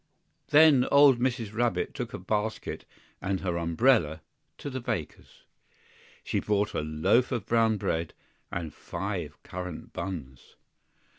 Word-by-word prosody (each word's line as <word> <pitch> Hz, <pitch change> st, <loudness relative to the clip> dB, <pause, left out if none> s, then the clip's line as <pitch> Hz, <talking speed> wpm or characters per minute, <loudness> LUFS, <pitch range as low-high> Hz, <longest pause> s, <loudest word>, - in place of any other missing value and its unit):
THEN 150 Hz, -4 st, +6 dB
old 140 Hz, -3 st, +6 dB
Mrs. 120 Hz, -4 st, -1 dB
Rabbit 120 Hz, +1 st, 0 dB
took 120 Hz, -4 st, -5 dB
a -, -, -5 dB
basket 105 Hz, +4 st, -3 dB, 0.4 s
and 95 Hz, 0 st, -1 dB
her 90 Hz, -3 st, -1 dB
umbrella, 85 Hz, -, +2 dB, 0.4 s
to 145 Hz, -, -6 dB
the 130 Hz, -, -3 dB
baker's. 90 Hz, -, -5 dB, 0.8 s
She -, -, -1 dB
bought 105 Hz, 0 st, 0 dB
a -, -, -1 dB
loaf 80 Hz, +11 st, +2 dB
of 105 Hz, -, -2 dB
brown 115 Hz, -1 st, +3 dB
bread 80 Hz, -4 st, -2 dB, 0.4 s
and 80 Hz, -3 st, -4 dB
five -, -, -5 dB
currant 90 Hz, -2 st, -7 dB
buns. 80 Hz, -9 st, -7 dB
105 Hz, 130 wpm, -28 LUFS, 85-120 Hz, 0.8 s, THEN